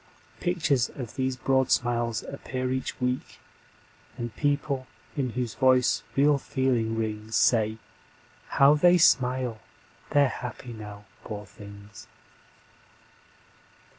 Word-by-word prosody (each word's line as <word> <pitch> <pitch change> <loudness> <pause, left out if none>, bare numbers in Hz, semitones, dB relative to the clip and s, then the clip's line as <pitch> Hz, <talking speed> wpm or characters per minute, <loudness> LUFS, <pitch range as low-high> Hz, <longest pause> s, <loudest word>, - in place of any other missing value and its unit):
Pictures 160 -8 +1
of 125 -4 -6
these 130 -1 -1
broad 130 0 +1
smiles 120 -2 +1
appear 130 -2 -4
each 130 0 -3
week, 125 0 -2 0.8
And 120 -2 -5
people 145 -2 -1 0.3
in 135 -4 -1
whose 120 -2 -2
voice 130 -1 +3
real 145 +1 +4
feeling 125 -5 0
rings 110 0 -3
Say: 110 -1 +3 0.7
How 140 +1 +5
they 175 +4 +5
smile! 125 -6 +3 0.5
They're 145 -1 +4
happy 125 -1 -6
now, 105 -2 -9 0.2
poor 105 -1 -6
things. 100 0 -13
125 Hz, 105 wpm, -27 LUFS, 110-135 Hz, 0.8 s, How